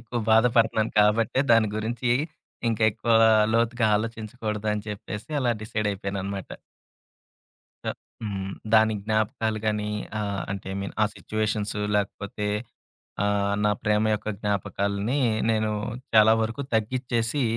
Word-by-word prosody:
ఎక్కువ 120 +1 -4
బాధపడుతున్నాను 110 -1 +3
కాబట్టే 115 +5 +3
దాని 115 -2 +5
గురించి 120 +3 -2 0.6
ఇంకా 115 0 -1
ఎక్కువ 115 +3 -1 0.4
లోతుగా 115 0 +2
ఆలోచించకూడదని 110 -1 -3
చెప్పేసి 105 +2 -6
అలా 125 -2 +2
డిసైడ్ 110 -1 -2
అయిపోయానన్నమాట. 100 0 -4 1.3
క - - -8 0.4
హ్మ్. 95 -3 -4 0.2
దాని 110 0 +5
జ్ఞాపకాలు 110 0 0
గానీ 105 -1 0 0.3
ఆహ్, 100 -2 -2
అంటే 100 -2 -5
ఐ - - -4
మీన్ 100 - -5
ఆ - - +6
సిట్యుయేషన్సు 105 -1 -2 0.2
లేకపోతే 105 +1 -3 0.8
ఆహ్, 100 0 +1
నా 105 - +4
ప్రేమ 105 -1 +2
యొక్క 105 - -5
జ్ఞాపకాల్ని 100 +4 -1 0.3
నేను 110 -1 +1 0.4
చాలా 110 0 +7
వరకు 115 +6 -2
తగ్గిచ్చేసి 120 +3 0
110 Hz, 115 wpm, -25 LUFS, 105-115 Hz, 1.3 s, చాలా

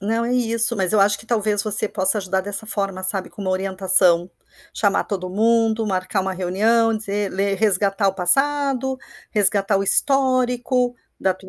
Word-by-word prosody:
Não 225 +4 -1
é 245 - -2
isso, 230 -2 +1
mas 190 -1 0
eu 215 - +3
acho 205 +1 +3
que - - -13
talvez 215 -3 0
você 215 0 -1
possa 190 +1 0
ajudar 190 -1 -2
dessa 205 +2 -5
forma, 195 -3 -3
sabe, 190 0 -1
com - - -13
uma 190 -2 -2
orientação, 185 -2 +2 0.4
chamar - - +1
todo 185 -3 -5
mundo, 225 +2 +1
marcar 190 0 -2
uma 190 0 -3
reunião, 220 +6 +1
dizer 205 -2 -3
ler, 195 +1 -1
resgatar 200 -1 +1
o 190 - -2
passado, 270 +6 +1 0.3
resgatar 200 -1 +2
o - - -1
histórico 250 0 +1 0.2
da 190 - +1
tua 190 +1 -16
205 Hz, 170 wpm, -20 LUFS, 190-230 Hz, 0.4 s, eu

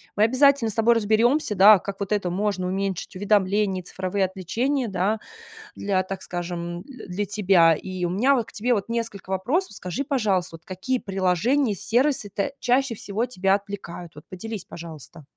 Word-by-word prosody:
Мы 210 - +3
обязательно 260 0 +4
с - - -2
тобой 230 +1 +4
разберемся, 225 +3 +2
да, 200 +2 +8
как 200 +2 -7
вот 200 0 -4
это 195 -4 0
можно 190 0 -1
уменьшить, 190 -1 -3
уведомления, 200 -1 +1
цифровые 190 +2 -1
отвлечения, 230 - -1
да, 205 +2 0 0.6
для, 195 -2 0
так 190 0 -6
скажем, 175 0 -5
дл 265 -6 -12
для 195 +3 -2
тебя. 185 -5 +4
И 185 +2 -6
у - - -1
меня 250 +10 +3
вот 235 - 0
к - - -13
тебе 240 +3 0
вот 205 +1 -2
несколько 230 -5 -4
вопросов. 250 - 0
Скажи, 190 +9 -4
пожалуйста, 200 - 0
вот 160 - -33
какие 195 +8 -2
приложения 200 - +1
и - - -6
сервисы 245 - +1
та 200 +7 -1
чаще 250 -1 +1
всего 210 +4 -2
тебя 195 -4 +1
отвлекают? 190 -5 -7
Вот 150 - -12
поделись, 205 +1 -6
пожалуйста. 160 -2 -10
200 Hz, 175 wpm, -24 LUFS, 185-230 Hz, 0.6 s, да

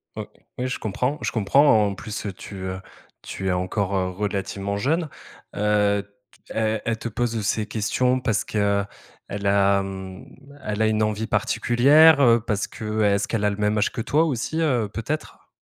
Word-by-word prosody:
Ouais, - - -6 0.3
oui 125 +1 -2
je 125 - -4
comprends 125 +7 -2
je - - -2
comprends, 110 +1 +4
en 100 - -2
plus, 110 +2 -6
tu, 100 - -9
heu, 95 0 -5 0.4
tu 95 - -6
es 95 - +2
encore, 95 +2 -1
heu, 90 -1 0
relativement 100 +1 -3
jeune. 155 +9 0 0.5
Heu, 105 -1 +2
t 100 - -27 0.5
elle 110 -1 0
elle 115 -1 -1
te 115 - -5
pose, 120 +2 -2
heu, - - -2
ces 105 +1 -1
questions 125 +4 0
parce 115 -5 0
qu'elle 100 -1 0 0.6
a, 100 0 +3
mmh, 95 +2 -8 0.4
elle 105 0 -2
a 110 - +4
une 110 0 +1
envie 110 +1 -1
particulière, 140 +8 +4
heu? 115 -1 +6
Parce 100 -2 -1
que, 110 0 -4
est-ce 100 -1 +2
qu'elle 105 -3 -1
a 105 - +2
le 100 - -5
même 105 +1 +1
âge 105 - +1
que 115 - -4
toi 155 +7 +2
aussi, 155 +2 -2
heu, 125 -9 +1
peut-être? 145 +8 -5
105 Hz, 185 wpm, -23 LUFS, 100-120 Hz, 0.6 s, heu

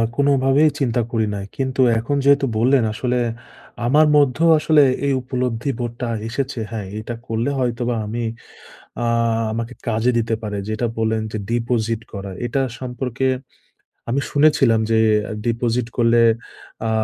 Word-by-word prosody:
কোনভাবেই 140 +2 +3
চিন্তা 120 -3 +1
করি 110 -2 +1
নাই। 100 - -5
কিন্তু 130 0 0 0.2
এখন 115 +5 -2
যেহেতু 140 0 +5
বললেন, 125 +3 +3
আসলে 125 +3 -1 0.7
আমার 150 +5 +5
মধ্যেও 145 +3 +3
আসলে 155 0 +4 0.3
এই 140 - +2
উপলব্ধি 125 0 -2
বোধটা 120 +1 -4 0.2
এসেছে। 130 +1 -3
হ্যাঁ, 110 -4 -4
এটা 115 +2 -5
করলে 115 +4 -1
হয়তোবা 120 -1 -1
আমি 115 +3 -3 0.8
আ - - 0 0.5
আমাকে 115 +2 -4
কাজে 115 +2 +2
দিতে 115 -1 0
পারে। 105 -2 -4
যেটা 110 +2 -1
বললেন, 110 0 0
যে 110 - -1
deposit 115 -1 0
করার, 100 -2 -6
এটা 135 +3 0 0.2
সম্পর্কে 125 0 -3 0.8
আমি 130 +4 +1
শুনেছিলাম 145 -6 +4
যে, 110 - +4 0.5
deposit 120 0 0
করলে 120 0 +4 0.7
আ - - 0
120 Hz, 135 wpm, -20 LUFS, 115-135 Hz, 0.8 s, যেহেতু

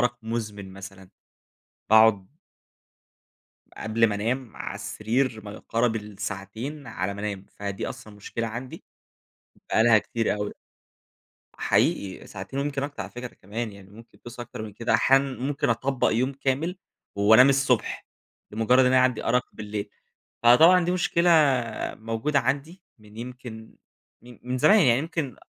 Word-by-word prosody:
أرق 120 0 0
مزمن. 105 -4 -5
مثلًاً 95 -1 -11 0.8
باقعد 110 -3 +5 1.5
قبل 115 +1 +2
ما 105 - -1
أنام 120 +3 -3
على - - -5
السرير 110 +4 -1
ما 105 - -7
يقارب 115 +2 -1
الساعتين 105 +7 -6
على 100 -3 -3
ما 100 - -8
أنام، 100 -2 -4
فدي 100 -1 -5
أصلًا 110 - -10
مشكلة 115 +3 -4
عندي، 120 +3 -7 0.9
بقى 110 - +3
لها 115 -2 +6
كتير 115 +2 -1
أوي. 105 0 -4 1.1
حقيقي 95 -2 0
ساعتين 95 +7 -7
ويمكن 140 -1 -2
أكتر 140 0 -4
على - - -9
فكرة 125 0 -8
كمان 110 +3 -5
يعني، 100 -1 -15
ممكن 115 +2 -16
توصل 120 0 -8
أكتر 120 -2 -8
من 105 -2 -7
كده، 115 +2 -1
أحيانًا 135 0 +3
ممكن 140 +2 -1
أطبق 130 +3 +1
يوم 130 +4 +1
كامل 140 +7 -2 0.4
وأنام 110 +6 +7
الصبح 135 -3 +1 0.5
لمجرد 115 +4 +3
إن 130 - +5
أنا 130 0 +5
عندي 125 -2 +1
أرق 125 +2 +2
بالليل؛ 105 0 -5 0.6
فطبعًا 165 +10 +7
دي 175 - 0
مشكلة 175 -1 +2 0.6
موجودة 115 +6 -1
عندي 145 +8 -2 0.2
من 105 0 -17
يمكن 120 -2 -9 0.5
من 125 +1 -6
زمان 210 +11 +6
يعني 125 -6 +4
يمكن 155 -3 -3
115 Hz, 140 wpm, -25 LUFS, 105-130 Hz, 1.5 s, وأنام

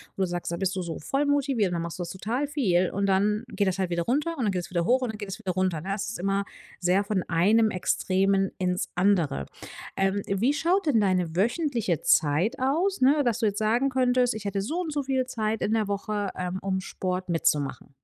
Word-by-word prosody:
wo - - -3
du - - +1
sagst: 175 -1 -4
„Da 170 - -1
bist 190 +1 -1
du 185 - -1
so 170 -2 -5
voll 275 - -1
motiviert, 275 -9 +1
dann 170 - -1
machst 170 +1 -6
du - - -2
das 170 - -6
total 230 +10 -2
viel, 190 - +1
und 200 +1 -1
dann 205 +3 +2
geht 200 0 0
das 190 0 0
halt 190 -2 -1
wieder 170 0 0
runter 295 - -1
und 245 - -1
dann 205 - +2
geht's 180 -2 -3
wieder 170 -2 0
hoch 255 +5 +3
und 245 -3 -1
dann 215 - -9
geht's 200 -2 -5
wieder 185 - -2
runter”, 185 -3 0
ne? 195 +2 -3
Es 200 - -3
ist 220 - -6
immer 195 +2 0 0.3
sehr 185 +2 +2
von 200 -2 -1
einem 210 +7 +3
Extremen 195 +1 +1
ins 180 -1 -1
andere. 175 - +2 0.5
Ähm, 195 +1 +1
wie 210 +8 +1
schaut 350 +6 +1
denn 230 -7 +4
deine 180 -4 +1
wöchentliche 230 - 0
Zeit 160 - +3
aus, 325 +9 +1
ne, 285 +3 +5
dass 240 -1 +1
du 225 - +2
jetzt 205 0 -1
sagen 235 +5 +2
könntest: 250 -1 +2
„Ich 215 -1 -7
hätte 200 -1 -1
so 270 +11 -3
und 315 -4 -4
so 290 - -1
viel 260 -1 0
Zeit 220 -3 -1
in 215 - 0
der 220 -2 +1
Woche, 205 0 -2
ähm, 180 +1 -3
um 190 -1 -1
Sport 185 0 -3
mitzumachen?“ 150 -4 0
200 Hz, 235 wpm, -26 LUFS, 185-245 Hz, 0.5 s, ne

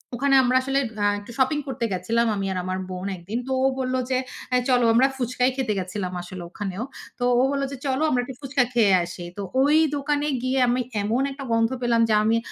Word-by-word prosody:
ওখানে 275 +2 +2
আমরা 250 0 +2
আসলে 270 +1 0 0.2
আ - - +3
একটু 205 +3 -11
শপিং 275 +3 +2
করতে 240 -3 -2
গেছিলাম 225 +6 +1
আমি 195 -1 -2
আর 185 - -2
আমার 185 +1 -2
বোন 185 +1 -5
একদিন। 200 +7 -4
তো - - -4
ও - - +4
বললো 255 0 0
যে, 260 - +2 0.4
"এ - - +5
চলো 245 -2 +4
আমরা" 250 +4 +5
ফুচকাই 250 0 +1
খেতে 250 -5 0
গেছিলাম 185 0 -4
আসলে 175 0 -8
ওখানেও। 195 +3 -4 0.4
তো - - -2 0.2
ও - - +5
বললো 275 -1 0
যে, 275 - -6
"চলো 265 +1 0
আমরা 250 -4 +2
একটু 255 +1 -8
ফুচকা 275 -1 +1
খেয়ে 220 -5 +4
আসি।" 175 +1 -7
তো - - -3 0.2
ওই 290 +3 +4 0.2
দোকানে 290 +1 0 0.2
গিয়ে 260 +1 +1
আমি 245 +1 +1 0.2
এমন 220 +5 0
একটা 275 0 -8
গন্ধ 230 0 +3
পেলাম 235 -1 +2
যে - - +3
আমি 225 +1 +3
245 Hz, 220 wpm, -24 LUFS, 205-265 Hz, 0.4 s, এ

